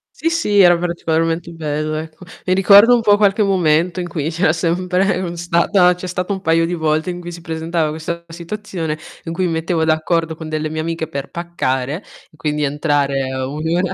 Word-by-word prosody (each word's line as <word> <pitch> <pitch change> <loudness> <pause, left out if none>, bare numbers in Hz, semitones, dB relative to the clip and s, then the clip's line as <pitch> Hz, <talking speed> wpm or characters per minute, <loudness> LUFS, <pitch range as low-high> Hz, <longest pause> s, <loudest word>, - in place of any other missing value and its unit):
Sì, 330 - 0
sì 210 -12 +1
era 175 -2 +7
particolarmente 165 -1 -1
bello, 155 -1 -3
ecco. 155 +3 -7 0.2
Mi 185 - +3
ricorda 200 +4 +7
un 240 - +3
po' 205 -2 +4
qualche 205 +1 +3
momento 175 -2 +2
in 175 - -3
cui 160 -2 -3
c'era 160 -1 +2
sempre 180 +3 0
un 175 -2 -4
stata 175 +2 +3
c'è 180 +1 -7
stato 180 +2 -2
un 190 - -5
paio 165 -2 +2
di 170 - -3
volte 160 +1 0
in 175 - -6
cui 175 0 -7
si 170 0 -9
presentava 160 0 -2
questa 170 +2 -5
situazione 170 -2 -5 0.3
in 165 - -4
cui 185 +2 0
mi 175 - 0
mettevo 160 0 0
d'accordo 160 +1 0
con 160 0 -8
delle 155 0 -2
mie 155 0 -3
amiche 165 0 -3
per 140 -3 -5
paccare 150 -5 -2 0.3
e - - -22
quindi 150 -1 -2
entrare 140 -2 0
1 140 +4 -4
ora 180 +1 0
165 Hz, 200 wpm, -18 LUFS, 155-180 Hz, 0.3 s, era